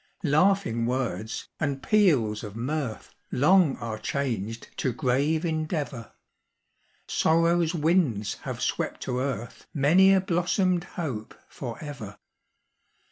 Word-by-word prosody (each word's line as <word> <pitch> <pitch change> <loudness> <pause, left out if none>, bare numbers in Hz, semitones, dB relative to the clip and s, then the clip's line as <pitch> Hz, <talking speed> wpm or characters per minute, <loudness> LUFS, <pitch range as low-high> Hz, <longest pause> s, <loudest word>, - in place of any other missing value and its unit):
"Laughing 155 - +2
words 125 -3 -2
and 140 -3 -2
peals 140 - +3
of 105 -1 -7
mirth, 125 0 -3 0.2
Long 160 +2 +4
are 110 -2 -5
changed 115 -6 -3
to 130 - 0
grave 145 +6 +1
endeavor; 155 - -3 0.9
Sorrow's 165 +1 +2
winds 150 - +1
have - - -5
swept - - -2
to 125 - -2
earth 125 -3 -4
Many 170 +7 +5
a 195 - +5
blossomed 180 0 +1
hope 130 -11 -4
forever. 125 -4 -7
140 Hz, 105 wpm, -27 LUFS, 115-170 Hz, 0.9 s, Many